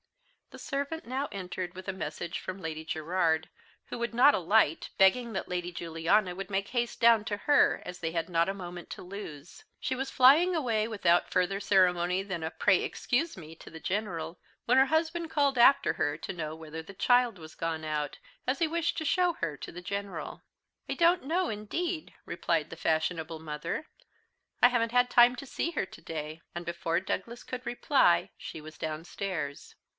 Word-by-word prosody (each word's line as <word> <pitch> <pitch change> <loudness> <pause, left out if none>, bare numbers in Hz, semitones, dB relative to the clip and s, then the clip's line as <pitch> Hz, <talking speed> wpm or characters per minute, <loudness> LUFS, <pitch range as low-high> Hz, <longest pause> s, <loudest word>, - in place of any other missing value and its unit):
The - - -12
servant 280 +4 -3
now 265 +4 -2
entered 180 -2 -5
with 185 +1 -9
a 195 - -1
message 170 -1 -4
from 185 +1 -6
Lady 160 -3 -5
Gerard, 160 0 0 0.4
who - - -6
would 235 0 -2
not 270 +4 +7
alight, 180 -3 +2
begging 230 +5 +4
that 190 - -3
Lady 175 -1 -3
Juliana 175 +3 +1
would 195 +1 -6
make 195 0 -1
haste 240 -1 -1
down 230 -2 +6
to 205 -1 -2
her, 290 +7 +3
as 180 0 -7
they 165 -1 -2
had 165 -1 -2
not 170 0 +2
a - - -1
moment 175 -3 -8
to - - -7
lose. 180 -5 -9 0.2
She 260 - -2
was 265 +1 -3
flying 300 +8 +6
away, 230 -8 +1
without 180 -6 +2
further 185 +2 +1
ceremony 180 -2 +3
than 190 -4 -4
a 160 - -1
"Pray, 185 +3 +3
excuse 290 - -1
me," 160 -2 -10
to - - -12
the 160 - -10
General, 185 -3 -3 0.3
when 250 +2 +4
her 265 - +5
husband 325 +2 0
called 280 -4 +2
after 270 +4 +6
her 145 0 -1
to 180 - -6
know 155 -3 -4
whether 160 0 -7
the 195 +5 -12
child 245 0 +3
was 160 -2 -11
gone 160 -1 -3
out, 150 -2 -2 0.3
as 260 +2 +1
he 330 - +3
wished 335 +1 -1
to 315 - -2
show 355 +3 +3
her 165 - -3
to - - -8
the 180 - -8
General. 200 +1 -5 0.5
"I - - -1
don't 345 +1 +4
know, 350 +5 +1
indeed," 315 - -3
replied 165 -2 -1
the - - -6
fashionable 160 0 -1
mother; 155 - -4 0.7
"I - - +9
haven't 230 -2 +1
had 245 0 +3
time 245 +1 +7
to 275 - -7
see 330 +5 -2
her 285 - -1
to 185 - -14
day;" 155 0 -6
and, 175 0 -5
before 170 0 -1
Douglas 235 +5 -4
could 255 0 -6
reply 240 - +3
she - - -8
was 155 0 -11
downstairs. 155 -1 -4
190 Hz, 190 wpm, -30 LUFS, 165-245 Hz, 0.7 s, I